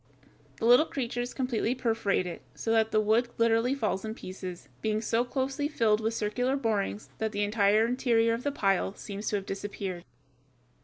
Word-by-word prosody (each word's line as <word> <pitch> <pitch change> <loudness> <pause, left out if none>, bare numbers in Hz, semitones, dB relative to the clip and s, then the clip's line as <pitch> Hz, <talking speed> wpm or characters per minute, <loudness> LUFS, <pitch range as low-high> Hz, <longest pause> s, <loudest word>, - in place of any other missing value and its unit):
The - - -2
little 245 +7 +6
creatures 245 -2 -3
completely 250 -2 -1
perforate 225 -6 0
it, 175 - -6
so 225 - -2
that 220 -1 +3
the 215 - +2
wood 220 +3 +2
literally 230 +3 +3
falls 210 -7 -1
in 220 0 -4
pieces, 185 -5 -8
being 215 0 0
so 230 +1 +1
closely 270 +3 -1
filled 225 -7 +2
with 225 +1 -1
circular 245 +6 0
borings 215 -4 -2
that 220 0 -1
the 205 0 0
entire 205 +1 +3
interior 230 -2 +2
of 230 - -2
the 285 - -1
pile 195 -5 +1
seems 205 0 -5
to - - 0
have 195 -1 -2
disappeared. 195 -3 -5
225 Hz, 175 wpm, -29 LUFS, 205-245 Hz, -, little